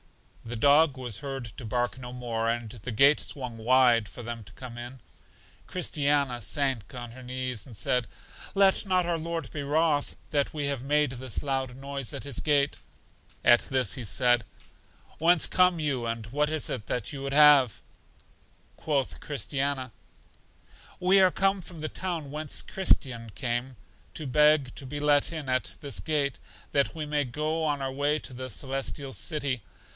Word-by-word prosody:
The 120 +1 -6
dog 140 +3 +4
was 120 -5 -3
heard 135 -3 -5
to - - -6
bark 120 +3 -1
no 125 -1 -8
more, 115 -2 -2
and 115 -2 -2
the 120 +2 -7
gate 140 +7 +6
swung 125 -5 -4
wide 120 -2 +4
for 120 - -9
them 115 -1 -6
to - - -12
come 125 -2 -9
in. 120 +2 -8 0.7
Christiana 145 -7 0
sank 135 -1 -1
on 120 -1 -6
her 130 +2 -11
knees, 125 -3 -4
and 115 -5 -9
said, 125 +1 +1 0.5
Let 195 -1 +4
not 185 -2 +2
our 170 -1 -1
Lord 165 +1 -4
be 145 - -4
wroth 145 0 +1
that 145 -2 0
we 145 -2 -1
have 140 -3 -1
made 145 +1 +1
this 130 -2 -3
loud 135 -3 -2
noise 135 -4 -4
at - - -4
His 140 -4 -2
gate. 145 -2 +2 0.7
At 120 0 +7
this 130 -5 +3
He 130 - -3
said: 120 +2 +4 0.8
Whence 170 +1 +5
come 180 -2 +3
you, 135 -6 -1
and 115 -1 -3
what 145 +5 0
is 155 -2 0
it 110 -6 -4
that 125 +2 -2
you 140 - -6
would 135 0 -3
have? 145 -6 +6 0.9
Quoth 140 -4 -1
Christiana: 140 -3 -2 1.1
We 190 +2 +5
are 185 -1 +5
come 195 +1 +1
from 170 -1 -8
the 155 0 -3
town 170 -7 -4
whence 150 0 -2
Christian 130 -11 +1
came, 125 0 -2 0.4
to 155 - -5
beg 150 0 +4
to 140 - -4
be 145 +3 -5
let 145 0 +3
in 155 -4 -5
at 130 0 -1
this 140 -2 -4
gate, 145 -4 0 0.3
that 140 +3 +1
we 155 -2 -4
may 150 0 0
go 155 +5 -2
on 145 -3 0
our 135 - -2
way 145 +2 +1
to 130 - -9
The 130 +1 -6
Celestial 135 +3 -3
City. 140 -5 -1
135 Hz, 175 wpm, -28 LUFS, 125-150 Hz, 1.1 s, At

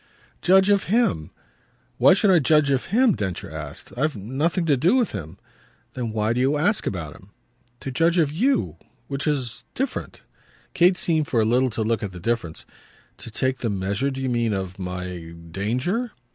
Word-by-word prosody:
"Judge 190 +2 +5
of 200 -1 +2
him." 185 - +1 0.7
"Why 185 - +7
should 200 0 +3
I 180 - +6
judge 150 0 +3
of 135 -2 +1
him?" 235 +1 +3
Densher 95 -4 -4
asked. - - -7
"I've 150 +3 0
nothing 145 - -1
to 150 -3 +3
do 165 - +3
with 250 -4 +2
him." 80 -1 -7 0.6
"Then 120 -3 -3
why 110 +1 0
do 125 - 0
you 140 +3 +2
ask 205 +8 +1
about 80 -6 -4
him?" 95 - -17 0.5
"To 135 - -5
judge 165 +6 +2
of 155 -4 +3
you 250 - +1 0.3
which 140 +2 -3
is 130 -6 -2
different." 270 0 -4 0.5
Kate 180 +1 +4
seemed 160 -3 0
for 120 - +1
a 110 - +3
little 125 +3 +3
to 110 -1 -2
look 115 +1 0
at 100 -3 -5
the 90 - -8
difference. 100 -5 -2 0.5
"To - - -7
take 130 +3 -1
the 115 - -1
measure, 100 +6 -1
do 135 -1 -5
you 130 - 0
mean, 120 -2 +1
of 95 -1 -4
my 90 -2 -6 0.2
danger?" 130 - -1
130 Hz, 185 wpm, -23 LUFS, 105-170 Hz, 0.7 s, Why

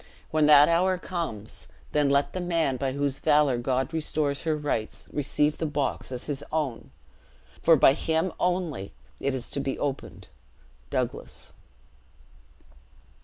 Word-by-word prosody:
When 155 -1 +3
that 150 -1 +8
hour 180 +2 +2
comes, 165 - -5 0.2
then 150 -2 +2
let 140 +1 +2
the 185 - -3
man 165 -7 0
by 135 0 -1
whose 140 -1 -1
valor 145 -4 +3
God 130 +4 -1
restores 150 -3 -1
her 155 -1 +1
rights, 145 -7 -3
receive 150 +1 0
the 160 - 0
box 145 -3 -2
as 125 -1 -4
his 145 -1 -3
own; 150 -7 -2 0.7
for 165 - +6
by 135 -2 +6
him 160 +4 0
only 175 - -1 0.3
it 140 -1 -1
is 125 -2 -3
to - - -2
be 135 -1 -2
opened. 140 -2 -4 0.6
Douglas.'" - - -4
145 Hz, 140 wpm, -27 LUFS, 135-160 Hz, 0.7 s, that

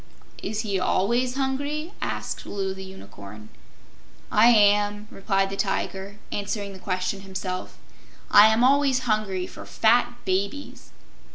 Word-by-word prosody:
"Is 215 0 -3
he 200 -4 -2
ALWAYS 240 +8 +1
hungry?" 285 +5 -2
asked - - -4
Loo 195 -1 -3
the 190 0 -9
Unicorn. 105 - -11 0.8
"I 215 +2 +6
am," 205 -2 +4
replied 195 -1 0
the - - -3
Tiger, 195 0 -3
answering 200 0 -3
the 190 - -11
question 185 +1 -2
himself. 190 -1 -6 0.5
"I 210 - +9
am 220 +2 +3
always 270 0 +3
hungry 215 -6 -1
for - - -10
fat 240 +2 +2
babies." 200 +9 -3
205 Hz, 125 wpm, -25 LUFS, 190-240 Hz, 0.8 s, I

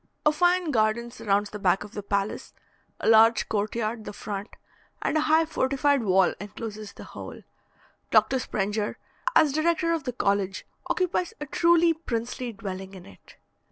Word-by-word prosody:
A 300 - +6
fine 355 +1 +2
garden 235 0 +1
surrounds 205 -3 0
the 210 - -6
back 190 -1 +2
of 205 - -11
the 210 - -5
palace, 200 0 -3 0.5
a - - -1
large 225 0 +6
court 210 0 -1
yard 225 0 -2
the - - -7
front, 205 +1 -5 0.5
and - - -1
a - - +4
high 315 +1 +4
fortified 280 -2 +1
wall 190 -3 +3
encloses 210 0 -7
the - - -11
whole. - - -9 0.7
Dr. 265 - +4
Sprenger, 210 -2 -2 0.4
as 305 - +5
director 335 +2 +1
of 320 -4 -3
the 250 - -2
college, 200 -4 -1 0.2
occupies 360 -1 0
a 295 - -4
truly 335 +2 +4
princely 245 -5 -4
dwelling 195 -2 -7
in 185 - -11
it. 95 - -17
225 Hz, 160 wpm, -26 LUFS, 205-300 Hz, 0.7 s, A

